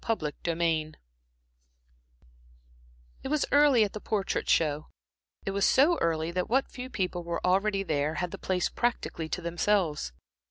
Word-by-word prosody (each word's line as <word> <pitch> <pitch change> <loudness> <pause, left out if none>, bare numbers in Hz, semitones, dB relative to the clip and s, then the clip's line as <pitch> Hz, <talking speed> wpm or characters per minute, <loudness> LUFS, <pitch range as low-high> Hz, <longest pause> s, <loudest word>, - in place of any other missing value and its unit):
Chapter 190 -10 -1
XVII 165 -2 0 2.3
It - - -5
was 300 +1 +1
early 285 -5 +6
at 205 - -2
the 215 - -6
Portrait 200 -3 -2
Show. 155 -1 +2 0.6
It 195 - -1
was 200 0 -1
so 310 +10 +4
early 165 0 0
that 180 +1 -2
what 265 +4 +1
few 255 0 -7
people 180 -6 -2
were 170 0 -3
already 195 +2 +2
there 150 -2 -1
had 175 +2 -2
the - - -7
place 185 -2 0
practically 230 -9 -2
to - - -3
themselves. 170 - 0
180 Hz, 150 wpm, -28 LUFS, 165-215 Hz, 2.3 s, early